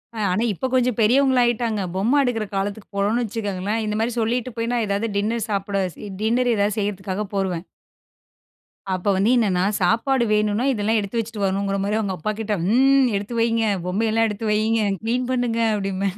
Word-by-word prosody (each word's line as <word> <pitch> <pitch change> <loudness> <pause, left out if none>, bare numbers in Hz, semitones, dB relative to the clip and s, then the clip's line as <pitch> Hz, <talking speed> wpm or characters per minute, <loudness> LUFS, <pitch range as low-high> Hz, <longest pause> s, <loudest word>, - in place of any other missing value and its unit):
அ, - - -7
ஆனா 200 +5 +1
இப்போ 195 - -5
கொஞ்சம் 250 -3 +2
பெரியவங்களா 260 +3 +4
ஆகிட்டாங்க. 230 -3 0
பொம்மை 225 +9 +2
எடுக்கிற 225 -4 -1
காலத்துக்கு 200 +2 -3
போனோம்னு 215 +5 +1
வச்சுக்கங்களேன், 210 0 -3
இந்த 210 - -2
மாதிரி 235 +2 0
சொல்லிட்டு 240 +2 -1
போய் 230 +1 -1
நான் 235 -3 +1
ஏதாவது 200 +3 -1
டின்னர் 220 +2 -1
சாப்பிட 200 0 -1 0.4
டின்னர் 240 +2 +2
எதாவது 205 +1 0
செய்கிறதுக்காக 200 0 -3
போயிருவேன் 185 -3 -1 1.3
அப்போ 185 +2 -1
வந்து 195 +4 +2
என்னன்னா 190 -6 +2 0.2
சாப்பாடு 235 +7 +2
வேணும்னா, 210 +3 +1
இதெல்லாம் 220 -1 +1
எடுத்து 205 +3 -3
வச்சுட்டு 220 -2 -4
வரணும்ங்கிற 195 +1 0
மாதிரி 205 +2 0
அவங்க 195 -3 -2
அப்பா 215 +7 -2
கிட்ட, 220 -1 -2 0.2
"ம்ம் 270 +3 +4
எடுத்து 205 +4 -4
வைங்க, 230 -1 +2 0.2
பொம்மை 200 +5 0
எல்லாம் 225 0 +2
எடுத்து 210 +1 -3
வையுங்க, 220 +1 +2 0.2
கிளீன் 245 +2 -1
பண்ணுங்க" 245 -2 0 0.2
அப்படின்பேன். 195 -1 -2
215 Hz, 170 wpm, -22 LUFS, 200-235 Hz, 1.3 s, பெரியவங்களா